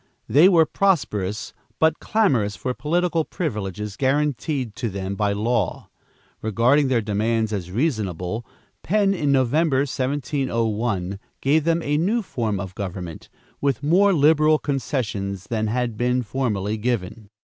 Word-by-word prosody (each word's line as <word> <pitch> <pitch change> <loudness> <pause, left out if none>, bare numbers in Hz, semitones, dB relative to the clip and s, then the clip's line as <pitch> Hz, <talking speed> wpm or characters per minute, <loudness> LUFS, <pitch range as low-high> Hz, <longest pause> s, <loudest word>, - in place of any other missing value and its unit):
They 150 - +6
were 165 -4 +5
prosperous, 105 - 0 0.2
but 160 0 +2
clamorous 125 - +1
for 125 +9 -3
political 165 +3 0
privileges 105 - -4
guaranteed 135 -3 0
to 115 - -2
them 95 0 -4
by 100 +1 0
law. 105 -1 -1 0.5
Regarding 120 +7 +3
their 125 -4 +1
demands 110 +1 0
as 90 -4 -3
reasonable, 105 - -2 0.4
Penn, 200 +1 +2
in 145 -7 0
November, 135 +2 +2
1701, 120 -8 -1 0.2
gave 150 +3 +2
them 165 0 +1
a 145 +1 +1
new 215 +7 +1
form 110 - -2
of 95 -1 -6
government, 90 -4 -6 0.3
with 140 -2 0
more 190 +7 +4
liberal 155 -1 +4
concessions 110 -9 -3
than 110 -1 0
had 120 0 -1
been 125 +2 +1
formerly 110 -4 -2
given. 110 -2 -3
120 Hz, 130 wpm, -23 LUFS, 105-150 Hz, 0.5 s, They